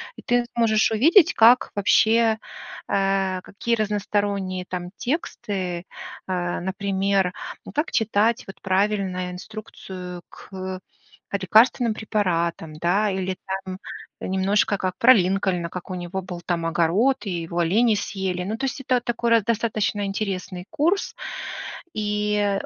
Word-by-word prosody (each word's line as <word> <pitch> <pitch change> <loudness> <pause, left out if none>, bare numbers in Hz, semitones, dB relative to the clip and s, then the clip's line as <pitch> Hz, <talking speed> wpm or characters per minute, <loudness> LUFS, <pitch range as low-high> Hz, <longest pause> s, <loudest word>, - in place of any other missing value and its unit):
И - - -11
ты 245 0 +1
сможешь 220 -2 +3
увидеть, 320 - +5
как 235 +3 +6
вообще, 220 +2 +4 0.5
э, 195 -1 +1
какие 235 +5 -2
разносторонние 205 -3 -1
там 180 -1 -4
тексты, 190 - -3 0.4
э. 175 -2 -1 0.2
Например, 195 -1 +1 0.3
ну, - - -8
как 300 +3 -1
читать 220 0 +2
вот 195 - -10
правильно 190 -2 0
инструкцию 180 -2 -8
к 185 -1 -7 0.5
лекарственным 220 +4 +4
препаратам, 170 -7 -1
да, 180 +7 +1
или 190 -1 -2 0.3
там 185 0 -5 0.4
немножко 195 +2 +1
как 185 -1 -3
про 250 +5 +8
Линкольна, 185 -3 +1
как 180 +1 -7
у 185 - -3
него 180 +2 -4
был 180 -1 -7
там 170 -2 -2
огород 175 +11 +2
и 200 - -3
его 170 +1 -4
олени 215 +7 +3
съели. 190 -3 -2
Но, 215 +4 -3
то 270 - -2
есть, 270 0 -3
это 255 -1 +2
такой 235 0 -1
раз 230 -3 +5
достаточно 215 -2 0
интересный 195 -3 -3
курс, 325 +6 0 0.8
и, 210 -1 0
200 Hz, 130 wpm, -24 LUFS, 185-220 Hz, 0.8 s, про